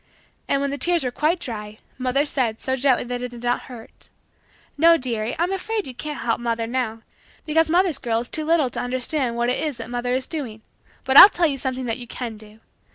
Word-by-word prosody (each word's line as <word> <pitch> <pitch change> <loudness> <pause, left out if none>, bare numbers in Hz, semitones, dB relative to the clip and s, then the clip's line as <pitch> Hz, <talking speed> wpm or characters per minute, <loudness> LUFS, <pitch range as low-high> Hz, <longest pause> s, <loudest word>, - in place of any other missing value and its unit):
And, 275 - +1
when 280 0 -1
the 285 - -4
tears 345 +3 +2
were 250 - -2
quite 310 +7 0
dry, 215 -6 -6 0.2
mother 255 +3 +1
said, 245 -6 -1
so 260 - -1
gently 260 -1 +2
that 245 0 -4
it 250 - -4
did 240 0 -11
not 245 0 -1
hurt, 235 -3 -13 0.7
"No 330 +3 +5
dearie, 235 -4 -3
I'm 345 +3 0
afraid 420 +2 -2
you 260 - -6
can't 295 +4 -6
help 230 -1 0
mother 230 -1 -2
now 225 -2 -3 0.4
because 320 +1 +2
mother's 345 -3 +2
girl 230 -3 -1
is 240 - -8
too 310 - -2
little 310 -5 +2
to - - -5
understand 255 0 -1
what 240 +1 0
it 250 - 0
is 300 -5 -2
that 230 +1 -8
mother 245 +1 -1
is 260 0 +1
doing. 240 -9 -5 0.4
But 265 +1 +3
I'll 400 - +13
tell 350 -4 0
you 285 -4 0
something 260 -1 -3
that 230 0 -2
you 240 - -8
can 235 -2 -6
do. 215 +1 -16
255 Hz, 225 wpm, -22 LUFS, 235-300 Hz, 0.7 s, I'll